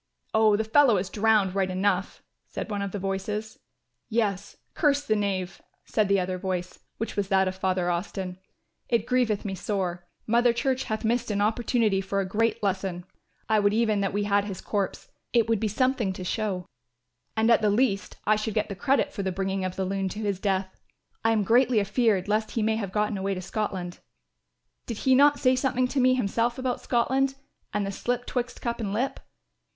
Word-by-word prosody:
"Oh, 220 -1 +5
the 220 - 0
fellow 235 0 +5
is 185 +1 -3
drowned 215 -3 +3
right 190 -1 0
enough," 190 0 -1 0.2
said - - -6
one 205 -1 -2
of 200 -1 -3
the 205 - -3
voices. 200 +3 -3 0.5
"Yes, 205 -4 -1 0.2
curse 290 -2 +2
the 215 - +2
knave," 195 -3 -2 0.2
said 215 -2 +1
the 200 0 +3
other 185 0 -2
voice, 180 -1 -3 0.2
which 225 - -4
was 205 -2 0
that 190 -1 +3
of 185 - -2
Father 185 -1 0
Austin. 180 +1 -4 0.5
"It 230 -3 +2
grieveth 245 -5 +1
me 195 - -2
sore. 180 -3 -3 0.2
Mother 235 +1 +3
Church 260 +2 0
hath 220 0 -3
missed 235 +1 +1
an 205 -1 0
opportunity 215 -1 +1
for 195 +1 -2
a 195 - 0
great 220 +3 0
lesson. 190 -2 -1 0.4
I 220 -1 +3
would 205 0 +2
even 220 -3 +2
that 195 - 0
we 205 +1 -1
had 205 0 +2
his 195 -3 -5
corpse, 200 -3 -3 0.2
it 230 -3 +4
would 225 -2 +2
be 220 - 0
something 230 -2 +1
to 185 - -7
show; 190 -1 -2 0.7
and 225 +1 +4
at 230 - +5
the 210 - +3
least 205 -2 +1
I 215 0 +4
should 215 0 -3
get 215 - 0
the 200 - -4
credit 280 +6 +1
for 200 - -3
the 190 -1 -1
bringing 195 +1 -2
of 185 -1 -3
the 190 - -1
loon 195 0 -1
to 210 - -6
his 200 -3 -1
death. 190 -2 -2 0.4
I 225 - +3
am 215 -2 +2
greatly 240 +2 +4
afeared 205 -1 +1
lest 215 +1 +1
he 225 - -1
may 220 0 +1
have 200 -4 -4
gotten 210 0 0
away 195 0 -1
to 185 - -5
Scotland. 185 -4 -3 0.9
Did 230 - -4
he 260 - +5
not 285 +2 +6
say 255 0 +4
something 255 -1 +1
to 275 - -1
me 255 0 +4
himself 235 +1 0
about 255 -1 -2
Scotland 265 +3 +1 0.4
and 210 -1 -1
the 195 - -3
slip 245 +4 -2
twixt 245 -1 -3
cup 235 0 -2
and 205 -3 -3
lip? 250 +6 -1
210 Hz, 205 wpm, -26 LUFS, 195-235 Hz, 0.9 s, not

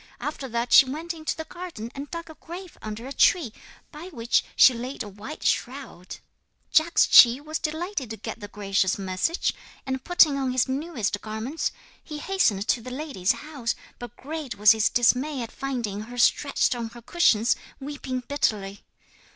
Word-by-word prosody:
After 285 -3 -5
that 235 +1 -1
she 275 - +9
went 325 +5 -4
into 315 -1 -4
the 320 - -4
garden 325 -11 -8
and 280 +1 -7
dug 335 0 -6
a 320 - -10
grave 350 +3 -10
under 215 +2 -6
a 270 - -6
tree, 300 - +3 0.4
by 310 +3 -9
which 235 -9 0
she 260 - +7
laid 245 +3 -5
a - - -9
white 210 +10 -9
shroud. 245 -9 -3 0.6
'Jagdschi 275 -6 +7
was 310 +2 -4
delighted 315 - -3
to 220 - -6
get - - -7
the 205 - -7
gracious 195 -2 0
message; 195 - -1 0.3
and, 265 -1 -3
putting 320 -5 +4
on 260 -2 -1
his 255 +1 +2
newest 260 - -2
garments, 220 +8 -3 0.3
he 300 - -7
hastened 290 - +1
to 235 - +2
the 255 - -8
lady's 255 - -1
house, 285 -6 -4 0.2
but 240 -3 -9
great 300 -1 -6
was 210 +1 +7
his 220 -1 +3
dismay 255 +3 +2
at 230 - -8
finding 240 -7 -4
her 240 +3 -9
stretched 280 +3 +2
on 235 -2 -4
her 240 +1 -13
cushions, 235 -8 +3 0.2
weeping 270 -2 -5
bitterly. 210 -8 -2
260 Hz, 170 wpm, -25 LUFS, 225-305 Hz, 0.6 s, she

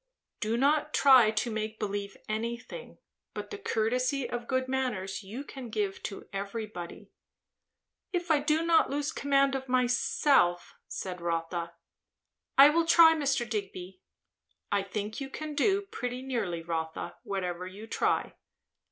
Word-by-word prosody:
"Do 225 +2 0
not 295 +3 +2
try 260 -6 +7
to 220 +2 -1
make 220 0 -3
believe 200 -1 -4
anything. 235 - -5 0.4
But - - -6
the 415 - -6
courtesy 250 - 0
of 240 0 -5
good 260 -1 0
manners 245 -8 -2
you 215 +8 -7
can 265 -4 -9
give 205 -3 -2
to 195 - -10
everybody." 200 -3 -6 1.0
"If 350 -2 -1
I 300 - +5
do 305 +3 +1
not 335 -1 +4
lose 290 +2 -1
command 275 -1 +2
of 265 -1 -4
myself," 250 -6 +2
said 180 -2 -5
Rotha. 170 0 -2 0.8
"I 280 +2 +9
will 335 +1 +2
try, 330 -1 +8
Mr. 275 -6 0
Digby." 190 -4 -5 0.7
"I 200 0 +2
think 210 +4 -5
you 270 - -4
can 310 +2 -6
do, 390 +7 +2
pretty 250 -9 -5
nearly, 210 -11 -2
Rotha, 160 -1 -4
whatever 185 -5 -3
you 200 +4 -9
try." - - 0
235 Hz, 140 wpm, -29 LUFS, 195-275 Hz, 1.0 s, I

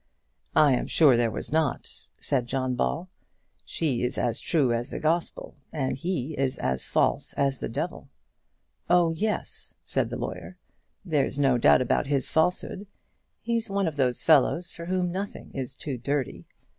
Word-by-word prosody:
"I 150 -2 +6
am 125 - 0
sure 145 -6 +5
there 120 -1 +2
was 110 - -3
not," 155 -3 -1
said 125 -4 0
John 130 0 -1
Ball. 165 +8 -1 0.6
"She 140 -8 -1
is 125 - -1
as 120 -2 0
true 140 -8 +2
as 120 +3 -1
the - - -5
Gospel, 165 +2 -1 0.2
and 135 -4 -1
he 160 -1 -3
is 135 -1 0
as 65 0 -1
false - - +1
as 135 -2 0
the - - -4
devil." - - -4 0.8
"Oh, 175 -1 +4
yes," 210 +6 -1
said - - 0
the - - -4
lawyer; - - -6 0.5
"there's 150 -5 0
no 135 -4 +3
doubt 125 - +5
about 125 - 0
his 140 -3 +1
falsehood. 180 +4 0 0.5
He's 230 -1 -1
one 195 -2 0
of 160 - -3
those 125 -4 0
fellows 160 +3 +4
for 170 - -8
whom 180 0 0
nothing 195 +3 -5
is 130 -3 -4
too 135 -5 -5
dirty. 140 +1 -2
145 Hz, 165 wpm, -27 LUFS, 130-170 Hz, 0.8 s, I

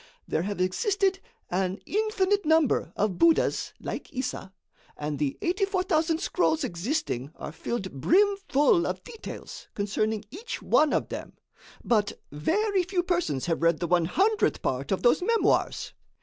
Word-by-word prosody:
There - - 0
have 200 +1 -3
existed 385 - +1 0.3
an 185 +1 0
infinite 410 -1 +1
number 310 - +2
of 205 -3 -1
buddhas 335 -1 +3
like - - -6
Issa, 255 -8 -4 0.5
and 150 -1 -3
the 145 -3 -1
84,000 360 -3 +1
scrolls 320 -3 +1
existing 195 - -2
are - - -7
filled 190 +5 -4
brim 380 - +3
full 295 +6 +4
of - - -4
details 455 - -9
concerning 215 +1 -1
each 440 +9 -6
one 305 -1 +3
of - - 0
them. - - -6 0.5
But 210 -3 +1
very 380 - +1
few 360 0 -1
persons 350 - -1
have 165 -2 -1
read 170 -1 +3
the 175 - -1
one 175 -1 +3
hundredth 405 - +1
part 130 +2 -2
of 190 - 0
those 240 - +4
memoirs. 460 +5 +1
290 Hz, 145 wpm, -27 LUFS, -, 0.5 s, full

